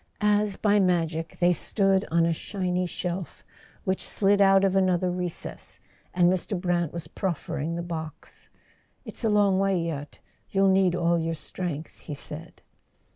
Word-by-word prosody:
As 210 -1 +2
by 210 0 +3
magic 165 -3 0
they 175 0 +4
stood 195 +3 +2
on 165 +1 +3
a 165 - +2
shiny 180 0 -2
shelf 180 0 -5 0.4
which 190 -1 -1
slid 200 0 +3
out 195 0 +6
of 195 -1 +2
another 185 -1 +2
recess, 180 -1 -4 0.3
and 175 -1 +3
Mr. 185 +1 0
Brant 175 -3 0
was 170 -2 -6
proffering 165 -2 -3
the 170 - -3
box. 160 -3 -7 0.6
"It's - - -7
a 225 - +3
long 205 -2 +3
way 195 -2 +2
yet; 150 -4 -4 0.3
you'll 195 0 +3
need 190 -2 +3
all 170 -1 +2
your 165 0 -1
strength," 160 0 -6
he 150 - -7
said. 150 +3 -9
180 Hz, 155 wpm, -26 LUFS, 165-195 Hz, 0.6 s, out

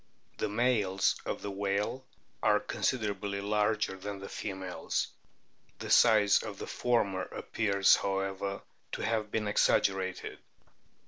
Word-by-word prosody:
The 110 - 0
males 105 -4 +2
of - - -3
the 100 - -3
whale 100 +6 -1 0.4
are - - +4
considerably 100 -4 -2
larger 105 0 0
than 100 +1 -6
the 100 0 -8
females. 95 -3 -3 0.7
The - - -6
size 105 -3 +6
of 105 -3 -7
the - - -6
former 105 -6 0
appears, 100 0 +2
however, 95 0 -2 0.3
to - - -3
have 110 -2 -1
been 110 0 -1
exag 105 - +3
gerated. 95 -1 -2
100 Hz, 125 wpm, -31 LUFS, 95-105 Hz, 0.7 s, size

